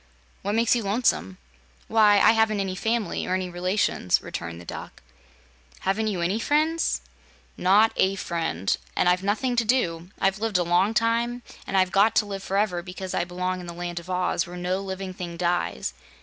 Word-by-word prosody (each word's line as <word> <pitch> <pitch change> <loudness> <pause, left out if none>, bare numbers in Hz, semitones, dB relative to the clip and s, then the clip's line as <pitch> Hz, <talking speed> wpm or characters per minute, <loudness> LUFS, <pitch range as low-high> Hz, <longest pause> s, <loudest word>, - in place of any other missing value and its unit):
What 205 +2 -1
makes 230 +1 +3
you 240 - 0
lonesome?" 195 - 0 0.5
"Why, 215 -2 +5
I - - +6
haven't 220 -2 +2
any 190 -1 -1
family 225 +3 -1
or 185 - +1
any 185 -1 -3
relations," 180 - +1
returned 85 0 -6
the 85 - -12
Duck. - - -8 0.8
"Haven't 205 +3 0
you 195 -5 -1
any 185 +6 0
friends?" 310 +6 +1 0.5
"Not 205 +5 +4
a 190 +1 +3
friend. 165 - -1 0.2
And - - +2
I've 180 +1 +3
nothing 220 +6 0
to 235 - +4
do. 180 -8 0
I've 195 +1 +1
lived 220 -3 0
a 180 - +2
long 175 +6 +2
time, 235 +2 +1 0.2
and 195 - 0
I've 185 -1 +3
got 205 +3 +4
to 210 - +4
live 195 -1 -5
forever, 195 -2 0
because 185 +1 -7
I 175 - 0
belong 180 +1 -3
in 180 - -8
the 170 - -7
Land 175 0 -4
of 170 +2 -13
Oz, 180 -1 0
where 175 +1 -8
no 180 +1 -1
living 190 -1 -5
thing 175 -2 -6
dies. 170 - -1
190 Hz, 190 wpm, -25 LUFS, 175-215 Hz, 0.8 s, I